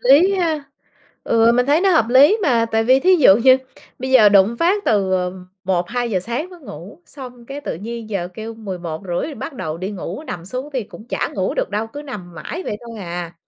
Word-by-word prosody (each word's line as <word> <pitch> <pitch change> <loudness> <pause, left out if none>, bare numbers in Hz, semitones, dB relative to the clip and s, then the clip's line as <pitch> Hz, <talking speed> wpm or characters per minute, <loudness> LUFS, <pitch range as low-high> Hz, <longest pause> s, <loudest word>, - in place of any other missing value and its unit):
lý 305 +10 +5
ha? 320 -6 -1 0.6
Ừ, 230 0 +4
mình 250 +1 +2
thấy 295 +3 +3
nó 390 0 +3
hợp 230 -10 +3
lý 275 - +6
mà, 235 -7 +2
tại 225 0 0
vì 260 +2 +4
thí 370 +5 +5
dụ 250 - +7
như 255 +3 +6 0.4
bây 260 +1 -4
giờ 230 -6 +7
đùng 200 0 +5
một 235 - -5
phát 390 +5 +1
từ, 195 -3 +1
ờ, 180 -1 0 0.3
1:00-2:00 190 +3 -1
sáng 240 - -4
mới 355 -2 -13
ngủ, 195 - -11
xong 250 -4 -11
cái 275 +3 -7
tự - - -4
nhiên 225 +5 -7
giờ 180 -4 -2
kêu 225 +1 -7
11:30 185 - -5
bắt 320 - -6
đầu 160 -8 -5
đi 190 +3 -4
ngủ, 190 - -6
nằm 170 - -6
xuống 255 +9 -5
thì 260 -3 -1
cũng 215 +2 -13
chả - - -1
ngủ 190 -2 -1
được - - -2
đâu, 210 +2 -2
cứ 290 +6 -9
nằm 190 - -9
mãi 310 - -6
vậy 205 - -3
thôi 230 -2 -9
à. 175 -2 -5
230 Hz, 225 wpm, -20 LUFS, 190-275 Hz, 0.6 s, dụ